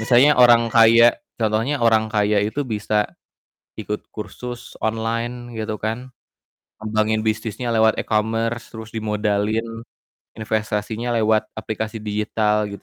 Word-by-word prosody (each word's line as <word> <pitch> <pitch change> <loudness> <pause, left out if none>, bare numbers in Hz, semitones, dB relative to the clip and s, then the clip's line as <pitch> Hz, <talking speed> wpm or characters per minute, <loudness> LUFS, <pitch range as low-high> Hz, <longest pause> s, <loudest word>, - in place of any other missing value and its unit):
Misalnya 125 +6 +5
orang 120 -2 +6
kaya, 115 +1 +7 0.2
contohnya 115 +6 0
orang 110 -2 +3
kaya 105 -1 +2
itu 135 +7 -2
bisa 105 -1 0 0.7
ikut 105 0 -4
kursus 120 +3 -8
online 115 +2 -2
gitu 110 0 -3
kan. 120 +4 -4 0.7
Ngembangin 110 0 0
bisnisnya 110 +2 -2
lewat 110 -1 +3
e-commerce, 115 +2 -1
terus 110 0 -10
dimodalin, 110 +1 -1 0.5
investasinya 110 +2 -2
lewat 110 -1 +2
aplikasi 110 +1 -4
digital 105 0 0
gitu. 100 0 -9
110 Hz, 110 wpm, -21 LUFS, 105-115 Hz, 0.7 s, kaya